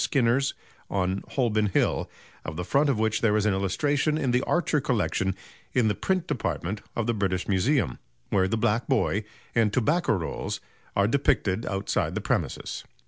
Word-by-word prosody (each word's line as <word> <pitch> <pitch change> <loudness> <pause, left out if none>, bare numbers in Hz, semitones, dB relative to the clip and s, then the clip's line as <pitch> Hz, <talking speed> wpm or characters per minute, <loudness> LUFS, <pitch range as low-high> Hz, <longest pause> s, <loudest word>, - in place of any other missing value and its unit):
Skinner's 135 +1 +2 0.3
on 95 0 0
Holborn 110 -5 +2
Hill, 95 - +1 0.3
of 80 - -5
the 90 - -3
front 140 - +3
of 135 - +2
which 110 0 +1
there 110 -2 +3
is 105 - +1
an 105 - +3
illustration 145 - +1
in 135 -5 0
the 125 +1 +3
Archer 160 -4 +1
Collection 105 -6 0 0.4
in 120 -4 +3
the - - +2
Print 185 - 0
Department 105 - -2
of 120 - 0
the 120 - +1
British 95 -4 -1
Museum, 100 - +1 0.3
where 95 -2 +3
the 115 +4 0
black 110 +2 +1
boy 110 -5 +1 0.3
and 115 -3 +3
tobacco 150 +9 +2
rolls 85 -6 -3 0.4
are 100 0 +3
depicted 115 -5 +1
outside 95 0 -1
the - - 0
premises." - - -2
110 Hz, 170 wpm, -27 LUFS, 100-135 Hz, 0.4 s, front